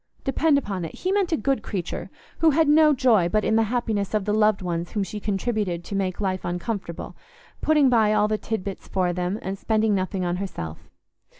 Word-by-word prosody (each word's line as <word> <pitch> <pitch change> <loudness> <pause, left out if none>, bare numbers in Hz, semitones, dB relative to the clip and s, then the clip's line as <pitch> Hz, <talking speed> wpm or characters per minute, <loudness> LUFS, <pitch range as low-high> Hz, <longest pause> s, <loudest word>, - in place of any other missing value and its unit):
Depend 295 +2 +2
upon 200 -9 -3
it, 165 - -6
he 370 - -2
meant 390 -3 +1
a 320 - +2
good 270 -5 0
creature, 185 -6 -4 0.3
who 325 - +5
had 315 +1 +3
no 305 +1 +6
joy 240 -10 +3
but 215 +3 +1
in 220 - +2
the 225 - +4
happiness 220 -4 -1
of 210 -2 0
the 210 - 0
loved 215 -2 +3
ones 170 -1 -3
whom 205 - 0
she 210 +2 -5
contributed 205 -3 -2
to 200 - -6
make 190 -2 -1
uncomfortable, 185 -1 -3 0.5
putting 300 -3 +4
by 225 -4 +4
all 210 0 +3
the 215 0 -1
tid 220 -4 -3
bits 195 0 -7
for 180 -2 0
them 180 +3 -2
and 195 +1 -4
spending 220 -1 +1
nothing 185 -1 -1
on 175 0 -1
herself. 80 - -6
210 Hz, 205 wpm, -24 LUFS, 185-240 Hz, 0.5 s, no